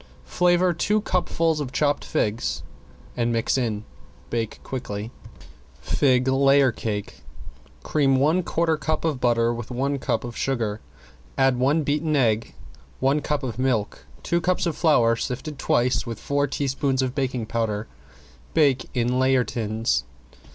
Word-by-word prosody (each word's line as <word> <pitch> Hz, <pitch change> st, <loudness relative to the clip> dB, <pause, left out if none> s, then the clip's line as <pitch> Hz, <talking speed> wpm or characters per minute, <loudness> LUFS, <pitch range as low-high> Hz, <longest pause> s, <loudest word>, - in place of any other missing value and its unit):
Flavor 180 Hz, 0 st, +2 dB
two 210 Hz, +5 st, +1 dB
cupfuls 165 Hz, -5 st, 0 dB
of 140 Hz, -4 st, -4 dB
chopped 145 Hz, 0 st, +1 dB
figs 105 Hz, -, -1 dB, 0.5 s
and 120 Hz, -1 st, 0 dB
mix 115 Hz, -1 st, +1 dB
in. 110 Hz, -5 st, -1 dB, 0.5 s
Bake 115 Hz, -2 st, -2 dB
quickly. 110 Hz, -4 st, -5 dB, 0.7 s
~FIG 130 Hz, -2 st, +2 dB
LAYER 135 Hz, 0 st, +4 dB
CAKE~ 105 Hz, -3 st, -5 dB, 0.6 s
Cream 140 Hz, -3 st, +2 dB
one 155 Hz, +7 st, +3 dB
quarter 165 Hz, -2 st, 0 dB
cup 155 Hz, +2 st, -2 dB
of 150 Hz, -6 st, -1 dB
butter 120 Hz, -1 st, +2 dB
with 120 Hz, -1 st, -6 dB
one 135 Hz, +3 st, -1 dB
cup -, -, -1 dB
of 120 Hz, -1 st, -7 dB
sugar, 115 Hz, -5 st, -2 dB, 0.6 s
add 135 Hz, -2 st, +3 dB
one 145 Hz, +5 st, +2 dB
beaten 150 Hz, +2 st, 0 dB
egg, 115 Hz, -5 st, +1 dB, 0.4 s
one 135 Hz, +3 st, +2 dB
cup 150 Hz, -2 st, -2 dB
of 125 Hz, -2 st, -4 dB
milk, 125 Hz, -6 st, -1 dB, 0.2 s
two 170 Hz, 0 st, 0 dB
cups 185 Hz, +1 st, +1 dB
of 165 Hz, -3 st, -1 dB
flour 120 Hz, -9 st, +4 dB
sifted 135 Hz, +5 st, -5 dB
twice 120 Hz, 0 st, +1 dB
with 115 Hz, -2 st, -6 dB
four 145 Hz, 0 st, 0 dB
teaspoons 135 Hz, -1 st, 0 dB
of 130 Hz, -1 st, -2 dB
baking 130 Hz, -4 st, -2 dB
powder. 110 Hz, -1 st, -2 dB, 0.7 s
Bake 140 Hz, -6 st, +3 dB
in 125 Hz, +1 st, +1 dB
layer 130 Hz, -1 st, +3 dB
tins. 110 Hz, -, -1 dB
130 Hz, 145 wpm, -24 LUFS, 115-145 Hz, 0.7 s, LAYER